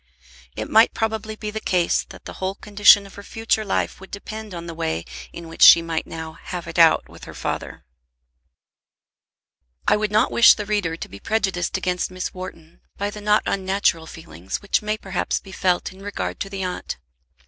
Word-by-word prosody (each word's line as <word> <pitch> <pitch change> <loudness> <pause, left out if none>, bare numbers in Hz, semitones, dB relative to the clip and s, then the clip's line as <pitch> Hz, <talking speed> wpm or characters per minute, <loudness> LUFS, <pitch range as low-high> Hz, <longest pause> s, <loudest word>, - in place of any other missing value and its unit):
It - - -4
might 220 +2 +5
probably 220 -1 -2
be 210 0 -5
the 220 - -4
case 180 -5 +1
that - - -13
the - - -7
whole 190 +1 -1
condition 205 0 +5
of 195 - -13
her 200 - -10
future 225 +1 -1
life 200 - -2
would 195 - -11
depend 215 +1 -7
on 170 0 -6
the 170 - -6
way 85 - -3 0.3
in 170 -1 -9
which 165 - -11
she 170 - +10
might 165 -1 -3
now 160 -1 -8
"have 180 -1 -6
it 165 0 -4
out" 165 -1 +5
with - - -13
her - - -10
father. - - -5 2.0
I - - +5
would 210 -1 -1
not 215 +1 +3
wish 235 - +7
the 210 - -5
reader 195 -6 -1
to - - -6
be 100 - -11
prejudiced 195 - -1
against 180 0 -1
Miss 185 0 -5
Wharton 170 -3 -10 0.2
by 205 +1 -2
the 210 - -9
not 210 +1 +3
unnatural 190 -4 0
feeling 90 - -12
which 200 - 0
may 215 0 -2
perhaps 190 -3 -2
be 195 - -14
felt 185 0 0
in 190 - -15
regard 205 0 -4
to 195 - -4
the 195 -1 -4
aunt. 180 -1 -4
Mrs. 65 +1 -45
190 Hz, 200 wpm, -22 LUFS, 170-210 Hz, 2.0 s, she